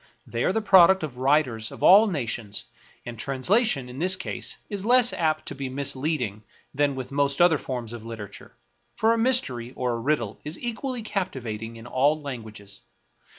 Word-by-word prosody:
They 120 0 -3
are - - +2
the 225 - 0
product 190 -2 +6
of 135 -5 -5
writers 130 -5 +1
of - - -9
all 205 +4 +8
nations; 115 - -3 0.4
and 120 -2 -8
translation, 140 - +1
in 125 +2 -9
this 185 +3 +3
case, 190 - -2
is 200 -2 -4
less 245 +2 +5
apt 155 -2 0
to - - -5
be 135 -1 -5
misleading 130 -5 -2 0.3
than 145 0 +1
with 130 0 -6
most 140 0 0
other 175 -4 +5
forms 120 -3 -5
of 115 -2 -8
literature, 110 -3 -9 0.4
for 225 - +3
a - - 0
mystery 130 - 0
or 125 -1 -1
a 115 - -3
riddle 115 -5 -1
is 150 +3 -5
equally 240 +1 -4
captivating 120 - -4
in 115 0 -11
all 140 +5 +2
languages. 110 -8 -9
140 Hz, 175 wpm, -25 LUFS, 120-185 Hz, 0.4 s, all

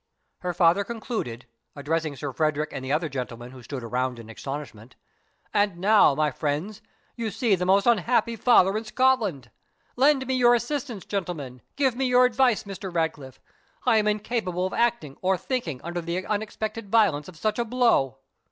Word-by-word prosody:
Her 180 - -2
father 175 +3 +3
concluded, 215 - -5 0.3
addressing 155 +1 -2
Sir 140 -1 -5
Frederick 155 0 0
and 130 - -5
the 130 - -4
other 160 +3 +1
gentlemen, 125 -3 -6
who 130 -1 -12
stood 130 +1 -7
around 125 +2 -2
in 115 -1 -10
astonishment, 130 -2 -8 0.6
"And 205 -4 +1
now, 200 -5 +5
my 150 0 +1
friends, 155 +10 -3 0.3
you 230 -2 -3
see 225 +1 +1
the 180 -1 0
most 195 +1 +4
unhappy 235 +1 +2
father 205 -4 +4
in 215 - -2
Scotland. 215 - +1 0.4
Lend 270 +1 +3
me 260 - -1
your 245 -1 +5
assistance, 240 -3 -3
gentlemen 160 - -4
give 265 -4 +1
me 265 +1 0
your 250 0 +5
advice, 250 -1 +2
Mr. 195 -1 -7
Ratcliffe. 155 -6 -3 0.5
I 240 -3 +4
am 210 -1 +2
incapable 210 -4 -1
of 190 - -3
acting, 230 - 0
or 190 0 +2
thinking, 180 - -3
under 175 +1 -4
the 170 +3 -3
unexpected 215 0 -4
violence 195 -10 +3
of 180 - -12
such 215 +7 -1
a 235 - +1
blow." 230 - +2
190 Hz, 170 wpm, -25 LUFS, 145-230 Hz, 0.6 s, now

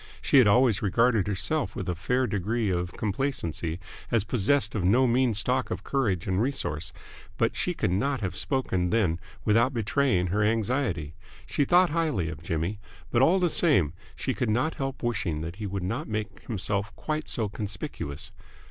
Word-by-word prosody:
She 140 - +4
had 125 - +6
always 115 -1 +4
regarded 110 +1 +2
herself 100 -2 -1
with - - -4
a 90 - 0
fair 125 +9 0
degree 105 0 -1
of 90 -1 -2
complacency 95 - -2 0.3
as 115 -4 +2
possessed 115 +2 +1
of 105 - -1
no 120 +9 +4
mean 125 -1 +2
stock 125 +5 +2
of - - -4
courage 105 - 0
and 95 +1 0
resource, 80 - -2 0.5
but - - +1
she - - -1
could - - 0
not 130 +7 0
have 90 -3 -3
spoken 95 -6 0
then 90 -6 +1 0.3
without 115 +5 +3
betraying 115 -4 +1
her 105 - +2
anxiety. 110 - 0 0.3
She 140 - 0
thought 180 +1 +4
highly 150 - 0
of 80 -2 -7
Jimmy, 85 +5 -2 0.3
but 120 - +3
all 170 +8 +5
the 180 -2 +2
same 140 - +3 0.2
she 130 - -2
could 125 -4 -1
not 130 +9 +1
help 135 -3 -4
wishing 100 -10 -1
that 85 +3 -6
he 105 - -4
would 95 -1 -3
not 115 - -3
make 105 -3 -5
himself 100 -2 -2
quite 155 0 -3
so 110 -3 0
conspicuous. 95 -8 -5
110 Hz, 175 wpm, -27 LUFS, 95-130 Hz, 0.5 s, had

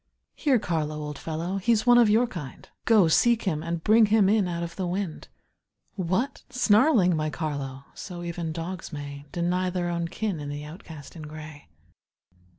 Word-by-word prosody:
Here, 280 -5 +2
Carlo, 160 -7 -2
old 150 -1 -6
fellow, 165 +4 -3
he's 220 +3 +2
one 245 0 +7
of 235 -3 +5
your 225 +4 +4
kind, 150 - -8 0.2
Go, 215 -6 +5
seek 235 +8 +3
him, 155 -7 -1
and 170 0 -4
bring 220 +1 +5
him 205 -2 +4
in 210 -3 +3
out 170 -1 -3
of 170 0 -6
the 185 -2 -2
wind. 180 -2 -4 0.7
What! 195 +9 -1
snarling, 220 - +4
my 155 0 -1
Carlo! 140 -4 -4
So 175 -2 -8
even 170 -1 -4
dogs 170 +3 -5
may 145 -1 -7
Deny 180 +2 0
their 175 -1 -2
own 170 -1 -1
kin 195 -1 -3
in 145 -1 -5
the 145 0 -5
outcast 155 -2 -11
in 165 - -8
gray. 150 - -10
175 Hz, 175 wpm, -26 LUFS, 155-205 Hz, 0.7 s, one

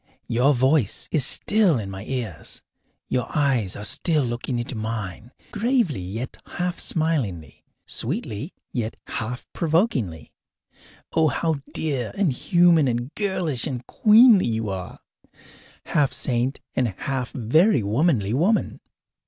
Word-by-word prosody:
Your 130 +5 +3
voice 130 -3 +2
is 155 -5 +4
still 200 - +3
in 100 -4 -5
my 95 0 -7
ears; 115 -10 -5 0.4
your 125 - -1
eyes 130 -10 +1
are 105 - -7
still 155 - +2
looking 120 +1 -3
into 120 +2 -4
mine, 110 -1 -5 0.2
gravely 220 - 0
yet 110 +8 -6 0.2
half 180 0 -2
smilingly, 135 - -2 0.2
sweetly 110 - -4 0.2
yet 115 -3 -3
half 120 +2 -5
provokingly. 155 - 0 0.8
Oh, 160 -1 +3
how 160 -1 -1
dear 140 -7 -2
and 190 -9 +2
human 170 +1 +4
and 120 +3 -2
girlish 185 - -1
and 125 -4 -5
queenly 220 - +6
you 110 -2 -2
are 95 -2 -6 0.8
half 145 -3 +1
saint 125 +2 -1 0.2
and 125 - +2
half 130 -3 -3
very 145 - +3
womanly 110 - +1
woman! 185 - +1
130 Hz, 125 wpm, -23 LUFS, 115-165 Hz, 0.8 s, queenly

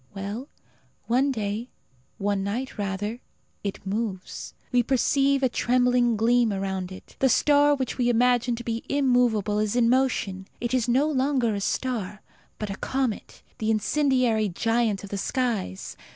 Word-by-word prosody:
Well, 205 +7 -5 0.6
one 260 +4 +2
day 215 0 -3 0.5
one 200 -1 0
night, 235 +7 -3
rather 205 +3 -3 0.4
it 200 -1 -5
moves. 195 -2 -4 0.2
We 250 -1 +4
perceive 275 +2 +2
a - - +5
trembling 245 -1 +2
gleam 235 +1 +3
around 190 -2 -3
it. 185 - -12
The 265 - +4
star 290 +2 +4
which 260 -1 -4
we 245 -1 +3
imagined 245 0 +2
to 240 - -6
be 230 0 -3
immovable 245 -7 +2
is 215 +1 0
in 235 -2 +4
motion. 210 -7 0
It 240 +1 -2
is 250 -2 +1
no 260 +5 +3
longer 265 -5 +1
a 200 - -3
star, 210 -3 -2 0.3
but 210 -2 -4
a 195 - -5
comet 260 -5 -3 0.2
the 220 - -1
incendiary 230 -1 +2
giant 225 +2 0
of 200 - -9
the 200 - -2
skies. 225 - -2
235 Hz, 150 wpm, -25 LUFS, 205-255 Hz, 0.6 s, a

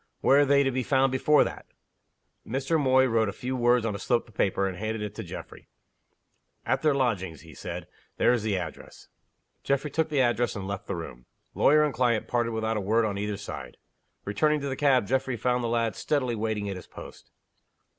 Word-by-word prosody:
"Where 140 - +5
are 145 - +5
they 140 0 +4
to 135 - +1
be 130 +1 -1
found 135 +1 +2
before 145 +3 +4
that?" - - -7 0.8
Mr. 135 +7 -1
Moy 130 -2 +4
wrote 115 -4 +2
a - - -2
few 125 +6 -4
words 120 -1 +3
on 110 - -1
a 100 - -5
slip 120 -1 0
of 110 - -18
paper, 95 -1 +1
and 95 - -4
handed 110 +2 -3
it 105 -1 -5
to 110 - -6
Geoffrey. 85 - -9 1.0
"At 135 - 0
their 150 -3 +3
lodgings," 100 - -1
he 80 -1 -14
said. - - -6 0.3
"There 120 - +4
is 120 - 0
the 105 -2 0
address." 85 -3 -8 0.5
Geoffrey 140 +2 0
took 160 +2 0
the 150 -3 0
address, 120 -2 +1
and 95 -2 -5
left 100 -1 -5
the - - -2
room. 65 -7 -8 0.3
Lawyer 150 +2 +4
and 150 -2 0
client 120 -3 +1
parted 120 -2 0
without 110 0 -1
a - - -1
word 110 +4 +2
on 100 -2 -2
either 105 0 -2
side. 70 -11 -8 0.5
Returning 150 +10 +1
to 140 - -3
the 135 - -2
cab, 130 -5 +3
Geoffrey 130 +1 -1
found 125 +2 0
the - - 0
lad 115 -1 0
steadily 130 -5 0
waiting 110 -2 -2
at 100 -2 -4
his 90 - -11
post. - - -12
120 Hz, 215 wpm, -27 LUFS, 105-130 Hz, 1.0 s, Where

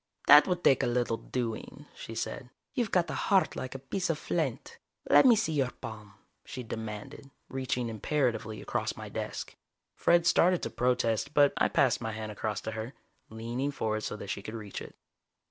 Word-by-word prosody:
"That 150 0 +9
would 180 -1 -1
take 135 - +5
a - - +1
little 120 -1 0
doing," 125 +5 -5
she 115 - -8
said. 125 +2 -4 0.2
"You've 240 -6 0
got 180 -3 +1
a - - -3
heart 195 -2 +3
like 130 +1 -5
a 135 0 -8
piece 180 +4 -2
of 165 - +1
flint. - - -3 0.3
Let - - +7
me 240 - +8
see 205 -7 0
your 135 -4 +1
palm!" 110 -5 -10 0.3
she 130 - -7
demanded, 110 +3 -7 0.2
reaching 130 -2 -2
imperatively 115 -1 -1
across - - -2
my - - -7
desk. - - -5 0.4
Fred 170 -1 +3
started 180 0 +4
to - - -3
protest, 125 +1 0
but 145 -1 +6
I - - +3
passed 130 -3 +2
my 110 -1 -3
hand 110 0 -5
across 105 -1 -3
to 110 - -4
her, 110 +4 -6 0.3
leaning 115 +5 -3
forward 110 -6 -2
so - - -4
that 100 -2 -6
she 100 - -4
could 110 +3 -7
reach 105 -3 -6
it. - - -10
125 Hz, 190 wpm, -30 LUFS, 110-145 Hz, 0.4 s, That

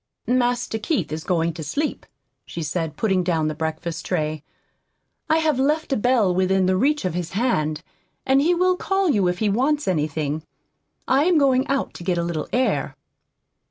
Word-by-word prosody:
"Master 245 -2 0
Keith 310 - -1
is 155 +1 -4
going 170 -2 0
to 160 - -7
sleep," 290 - -3 0.4
she 170 - -6
said, 155 0 -3
putting 190 -4 +1
down 165 -3 0
the - - -3
breakfast 160 +2 -4
tray. 155 -4 -2 0.9
"I 315 - +4
have 310 -4 +1
left 295 +2 +1
a - - +2
bell 225 -5 +2
within 185 +1 +2
reach 295 -2 +1
of 180 - -1
his 175 0 -4
hand, 160 -9 0 0.4
and 265 +1 +4
he 345 +4 +3
will 365 +1 +3
call 385 -3 +1
you 200 -7 +2
if 180 0 0
he 215 - 0
wants 270 +8 +1
anything. 155 -3 -1 0.7
I 275 +3 +3
am 355 -2 +4
going 270 -1 +3
out 275 0 -1
to - - -9
get 180 -1 0
a 170 - 0
little 170 -2 -3
air." 255 +1 0
190 Hz, 180 wpm, -23 LUFS, 165-275 Hz, 0.9 s, I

